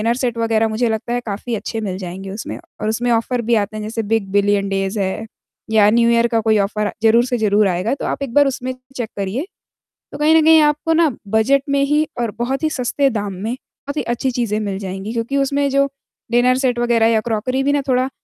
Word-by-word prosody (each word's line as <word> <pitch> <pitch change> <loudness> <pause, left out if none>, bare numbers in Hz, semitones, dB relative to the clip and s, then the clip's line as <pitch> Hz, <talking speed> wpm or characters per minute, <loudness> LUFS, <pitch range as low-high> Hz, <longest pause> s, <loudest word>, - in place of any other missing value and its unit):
Set 245 -2 -2
वगैरह, 225 -1 +1
मुझे 225 +2 0
लगता 220 +2 -2
है, 245 - +1
काफ़ी 220 +3 -3
अच्छे 220 +1 -4
मिल 190 -3 -3
जाएँगे 190 +1 -7
उसमें, 205 +3 -6 0.2
और 215 - 0
उसमें 240 +2 0
ऑफ़र 235 +2 0
भी 235 - +5
आते 215 0 -1
हैं, 215 - -5
जैसे 225 +1 -3
बिग 220 -3 +1
बिलियन 200 0 +2
डेज़ 195 +2 -1
है, 195 +3 -2 0.5
या 210 -2 +5
न्यू 235 +1 +3
ईयर 235 0 +3
का 230 -1 +1
कोई 220 0 +3
ऑफ़र 210 +1 -1
ज़रूर 230 +2 +5
से 250 -1 -1
ज़रूर 210 -2 +3
आएगा। 185 +5 0
तो - - -6
आप - - -3
एक 255 -4 -5
बार 285 +1 +5
उसमें 255 -1 -3 0.2
चेक 235 -3 -3
करिए। 200 - -2 0.7
तो - - -7
कहीं 305 +2 +4
न 320 - +5
कहीं 320 0 +7
आपको 300 +2 +2
ना, 325 -1 +4 0.2
बजट 220 +7 +2
में 280 0 +2
ही 295 +2 +2 0.2
और 230 -3 -1
बहुत 265 +5 -2
ही 315 - +2
सस्ते 275 0 0
दाम 205 -4 -3
में 210 +6 -4
बहुत 280 +2 -10
ही - - +1
अच्छी 240 +3 -1
चीज़ें 230 -4 -1
मिल 200 -3 -3
जाएँगी, 195 +2 -5
क्योंकि 235 +4 -2
उसमें 280 +1 +1
जो 275 +1 +2 0.4
डिनर 250 +1 +4
सेट 255 -2 0
वगैरह 235 -2 +3
या 225 -1 +2
क्रॉकरी 240 +4 -1
भी 280 - +2
ना, 290 - +1
थोड़ा 255 0 +1
230 Hz, 230 wpm, -19 LUFS, 210-260 Hz, 0.7 s, कहीं